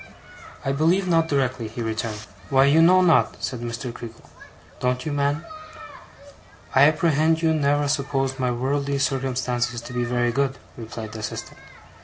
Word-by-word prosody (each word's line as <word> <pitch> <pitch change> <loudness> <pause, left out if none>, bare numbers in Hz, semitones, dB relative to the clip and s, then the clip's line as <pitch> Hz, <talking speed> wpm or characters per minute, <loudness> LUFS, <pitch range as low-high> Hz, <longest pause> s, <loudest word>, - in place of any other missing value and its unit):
'I 135 - +1
believe 165 +7 +2
not 165 -2 +3
directly,' 130 -5 -1
he 115 +2 -6
returned. 110 -1 -4 0.2
'Why, 135 0 +5
you 150 +4 +5
know 185 +3 +6
not,' 170 -3 +3
said 125 -3 -3
Mr. 120 +1 -5
Creakle. 115 -1 -11 0.5
'Don't 125 0 -1
you, 155 - -2
man?' 145 +2 0 1.3
'I 135 +2 +7
apprehend 160 +1 +2
you 160 -1 +3
never 145 -1 +1
supposed 135 -1 -1
my 125 -1 +1
worldly 140 +3 -1
circumstances 125 -3 -1
to 125 - -9
be 125 0 -1
very 120 0 0
good,' 135 +1 0 0.2
replied 110 -1 -7
the 110 - -7
assistant. 110 - -6
135 Hz, 155 wpm, -23 LUFS, 120-145 Hz, 1.3 s, I